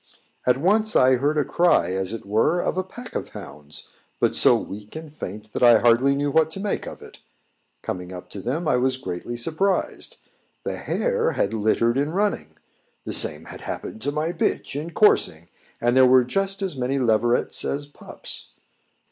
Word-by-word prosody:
At 125 0 +4
once 215 +8 +1
I 130 0 +5
heard 145 +4 0
a 150 - +2
cry 155 - +2
as 95 +1 -2
it 115 -2 -6
were 110 - +2
of - - -1
a 185 - -1
pack 240 +6 -11
of - - -4
hounds 75 +1 -9 0.3
but - - +1
so - - +5
weak 105 +4 -9
and 155 -2 -8
faint 105 -6 -8
that - - -3
I 120 -2 +7
hardly 120 +4 +3
knew 145 +1 -1
what 160 +1 +3
to 195 - -6
make 205 +1 -3
of - - -9
it. - - -14 0.6
Coming 90 0 -5
up 90 -1 -9
to 100 - -6
them, 150 - -2
I 125 - +3
was 130 +1 +1
greatly 105 +2 -5
surprised. 190 - -1 0.5
The - - -3
hare 485 -1 0
had 100 - -1
littered 115 +3 +1
in 145 +3 -1
running; 180 - -1 0.5
the - - -3
same 75 +1 +4
had - - -10
happened 110 - -6
to 145 - -1
my 155 +3 -1
bitch 170 -4 -1
in 150 +4 -4
coursing, 90 - +3 0.3
and 120 +1 +1
there 130 -1 +7
were 130 0 +6
just 195 +9 -1
as 190 -6 -2
many 130 +1 -1
leverets 120 -1 +1
as 145 +1 -2
pups. 145 - -9
130 Hz, 190 wpm, -23 LUFS, 110-160 Hz, 0.6 s, I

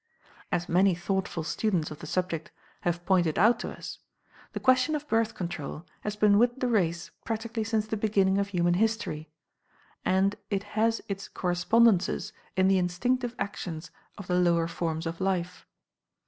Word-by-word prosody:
As 175 - 0
many 185 +1 +4
thoughtful 180 -1 -2
students 175 -1 -1
of 155 - -8
the 155 - -8
subject 175 -2 -2 0.3
have 175 0 -1
pointed 175 -5 +2
out 225 +5 +5
to - - -4
us, - - -8 0.5
the - - -3
question 255 +4 +3
of 300 0 -4
Birth 225 -2 +1
Control 170 -2 -5
has 210 0 -4
been 210 -1 +5
with 240 +2 +2
the 255 - +1
race 175 -8 0
practically 225 0 -3
since 215 -1 0
the 220 - -2
beginning 200 -2 +2
of 200 - 0
human 175 -3 +1
history; 185 -7 -1 0.7
and 195 +2 +2
it 200 -1 -1
has 225 +1 +1
its 195 -1 -4
correspondences 185 +3 +2 0.2
in 185 0 +4
the 190 -1 +4
instinctive 240 +8 0
actions 175 -4 -5 0.3
of 200 - -8
the 180 0 +1
lower 170 -2 +3
forms 165 -1 -3
of 165 +2 -4
life. 180 -2 -2
190 Hz, 160 wpm, -28 LUFS, 175-220 Hz, 0.7 s, out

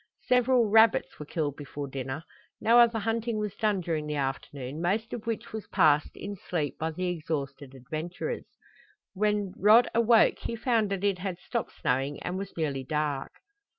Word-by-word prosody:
Several 250 -2 +3
rabbits 220 +1 +4
were 150 - -7
killed 150 -4 -2
before 145 0 -6
dinner. 135 +3 -5 0.4
No 235 +2 +5
other 235 -1 +5
hunting 225 +1 -1
was 210 -2 -3
done 210 -4 +1
during 160 -3 -2
the 150 - -2
afternoon, 135 +1 -4
most 210 +6 0
of 230 -2 -6
which 225 -1 -3
was 220 -3 -5
passed 150 0 +3
in 200 0 -5
sleep 160 -6 -3
by 160 - -1
the 180 +3 -3
exhausted 150 -5 -4
adventurers. 160 - -5 0.7
When 205 -1 0
Rod 220 +4 +6
awoke 230 0 +4
he 230 - -4
found 225 -2 +1
that 195 -1 -3
it 200 -3 +1
had 185 -2 -3
stopped 230 +5 -4
snowing 135 +3 0
and 180 - -3
was 195 -1 -6
nearly 140 -5 -1
dark. 150 0 -2
180 Hz, 170 wpm, -28 LUFS, 150-220 Hz, 0.7 s, Rod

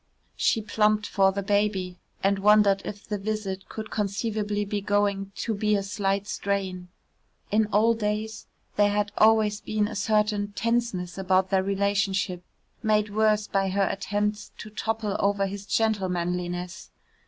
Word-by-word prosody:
She 220 - +1
plumped 215 -1 +2
for 195 -1 +3
the 200 +1 -3
baby, 195 -3 0 0.2
and 195 0 +2
wondered 205 -1 +5
if 205 -1 -8
the 210 -1 -3
visit 195 -2 -4
could 215 -1 -7
conceivably 210 0 -1
be 205 0 -2
going 200 -1 0
to 225 - -2
be 210 0 +1
a 200 - 0
slight 200 0 -1
strain. 190 -3 -2 0.6
In 215 +1 +3
old 225 +2 +3
days 215 +1 -3 0.3
there 205 0 +5
had 205 0 0
always 215 -1 +4
been 215 -1 0
a 215 - -7
certain 210 -1 +1
tenseness 225 -6 -1
about 190 0 +2
their 190 -1 +3
relationship, 195 -2 0 0.4
made 210 -2 +1
worse 215 -1 +2
by 195 -1 0
her 195 0 +1
attempts 210 +2 -2
to 215 - -9
topple 220 -1 -2
over 200 0 +2
his 200 +1 -6
gentlemanliness. 180 -4 -1
205 Hz, 145 wpm, -26 LUFS, 195-215 Hz, 0.6 s, wondered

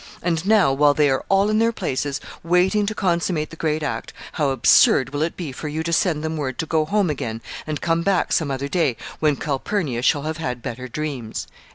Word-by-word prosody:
And 170 +1 -1
now, 205 -10 +5
while 145 +1 +4
they 145 -2 +3
are 130 - 0
all 195 +2 +3
in 215 - +2
their 230 +1 +3
places, 140 - -2 0.2
waiting 180 +5 +2
to 215 - -2
consummate 170 -4 0
the - - -9
great 155 -1 -1
act, - - -4 0.2
how 145 -3 0
absurd 135 0 +5
will 145 +1 -3
it 165 +2 -1
be 165 -6 -4
for 140 +4 -6
you 155 +2 -3
to 170 +1 -2
send 165 -4 +1
them 160 0 -2
word 130 -4 -3
to 160 - -2
go 155 -1 +1
home 195 0 +1
again, 115 -5 -4 0.3
and 155 -1 -3
come 165 0 +1
back 190 0 +1
some 155 -4 +1
other 135 +1 -2
day, 140 -7 0 0.2
when 150 -2 +2
Calpurnia 140 - -2
shall 140 +3 +2
have 160 +1 -3
had 125 -7 -4
better 125 +1 -5
dreams!" 130 -4 -4
155 Hz, 220 wpm, -22 LUFS, 140-175 Hz, 0.3 s, now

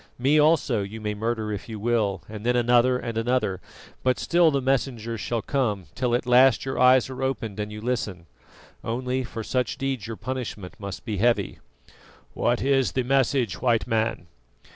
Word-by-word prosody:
Me 140 +5 +3
also 150 -7 +3
you 100 +3 -6
may 105 -1 -3
murder 110 0 -2
if 105 - -7
you 110 -2 -6
will, 105 -4 0
and 105 0 -8
then 125 +1 +2
another 120 +1 +4
and 115 -2 -3
another; 115 -6 0 0.4
but 130 0 +1
still 170 -1 +3
the 140 -2 +1
messengers 125 -4 -1
shall 115 -2 -2
come, 105 -9 -1
till 125 -2 0
at 125 - -1
last 125 +1 +5
your 135 - -3
ears 130 0 +5
are 130 0 -7
opened 125 -6 -3
and 105 0 -3
you 105 - -7
listen. 105 -7 -3 0.6
Only, 125 +3 -2
for 115 -2 -6
such 125 +2 -1
deeds 135 -5 -3
your 115 -1 -6
punishment 115 -6 -5
must 100 +2 -7
be 110 -4 -3
heavy." 120 +4 +1 0.7
"What 120 0 0
is 135 -1 +2
the 130 - 0
message, 130 -5 +1
White 115 -6 +2
Man?" 110 -4 -1
120 Hz, 180 wpm, -25 LUFS, 110-130 Hz, 0.7 s, last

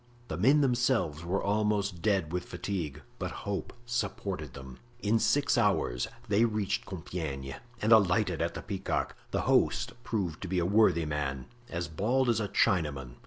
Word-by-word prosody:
The 75 - -3
men 135 - +5
themselves 120 - +1
were 90 +3 -1
almost 100 -3 0
dead 95 -6 +1
with 90 0 -2
fatigue, 80 -8 -4 0.2
but - - -2 0.2
hope 100 -1 -3
supported 100 - -3
them. 65 -2 -10 0.2
In 110 +2 +3
six 140 -1 +3
hours 95 - +1 0.2
they 105 +2 +3
reached 105 -4 0
Compiegne 80 -7 -5 0.3
and 110 - +2
alighted 100 -5 +4
at - - -1
the - - -6
Peacock. - - -2
The - - 0
host - - +2
proved 95 -8 -2
to 95 - -4
be 90 +1 -1
a 85 - +2
worthy 95 -4 +4
man, 70 -3 -2 0.2
as 85 -4 -3
bald 120 +10 +1
as 115 - +3
a 105 - -1
Chinaman. 75 - +1
95 Hz, 165 wpm, -30 LUFS, 80-110 Hz, 0.3 s, men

